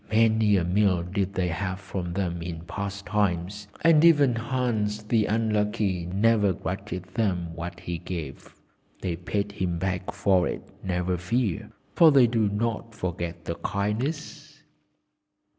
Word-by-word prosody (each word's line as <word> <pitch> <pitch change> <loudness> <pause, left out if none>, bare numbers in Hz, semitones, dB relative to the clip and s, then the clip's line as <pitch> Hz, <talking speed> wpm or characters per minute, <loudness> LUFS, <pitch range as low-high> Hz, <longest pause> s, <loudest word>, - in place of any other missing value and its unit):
Many 110 -2 +4
a 90 - +1
meal 90 0 +2
did 95 +2 -2
they 90 -1 +1
have 95 +3 -3
from 95 -3 -5
them 85 -2 -2
in 85 -1 -5
past 100 +3 -5
times, 100 0 -1
and 165 -2 +6
even 145 -6 +6
Hans 115 -3 -1
the 110 0 +2
Unlucky 105 -4 0
never 105 +1 +3
grudged 90 +2 -5
them 90 -7 -1
what 85 +1 -6
he 85 -1 -4
gave. 80 -6 -7 0.5
They 90 -3 -1
paid 100 +4 -2
him 90 -4 -2
back 90 +1 -2
for 95 -3 +2
it, - - -4 0.2
never 90 -1 -1
fear, 100 +1 -1 0.2
for 165 -2 +7
they 135 -3 +7
do 115 -3 +2
not 115 +1 -2
forget 85 -3 -4
a 85 - 0
kindness." 110 - -3
100 Hz, 140 wpm, -26 LUFS, 90-110 Hz, 0.5 s, for